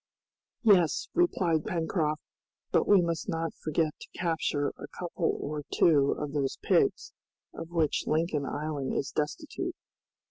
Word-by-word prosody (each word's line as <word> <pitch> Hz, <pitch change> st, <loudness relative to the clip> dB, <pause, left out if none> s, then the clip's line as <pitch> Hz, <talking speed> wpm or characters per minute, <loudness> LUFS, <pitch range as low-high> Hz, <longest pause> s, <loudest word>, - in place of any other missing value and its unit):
"Yes," 185 Hz, -8 st, +4 dB
replied 175 Hz, -, +2 dB
Pencroft, 160 Hz, -5 st, -1 dB, 0.5 s
"but -, -, +3 dB
we 200 Hz, -3 st, +6 dB
must 170 Hz, +2 st, -2 dB
not 165 Hz, -2 st, -2 dB
forget 155 Hz, 0 st, +1 dB
to -, -, -12 dB
capture 160 Hz, -4 st, 0 dB
a -, -, -10 dB
couple 175 Hz, -1 st, -2 dB
or 150 Hz, 0 st, -3 dB
two 145 Hz, -4 st, +4 dB
of 150 Hz, -1 st, -4 dB
those 140 Hz, -3 st, -1 dB
pigs, -, -, +2 dB, 0.4 s
of 165 Hz, -, -7 dB
which 165 Hz, -3 st, 0 dB
Lincoln 155 Hz, -3 st, 0 dB
Island 145 Hz, -2 st, -3 dB
is 140 Hz, -, -1 dB
destitute." 150 Hz, 0 st, -3 dB
160 Hz, 135 wpm, -29 LUFS, 150-170 Hz, 0.5 s, we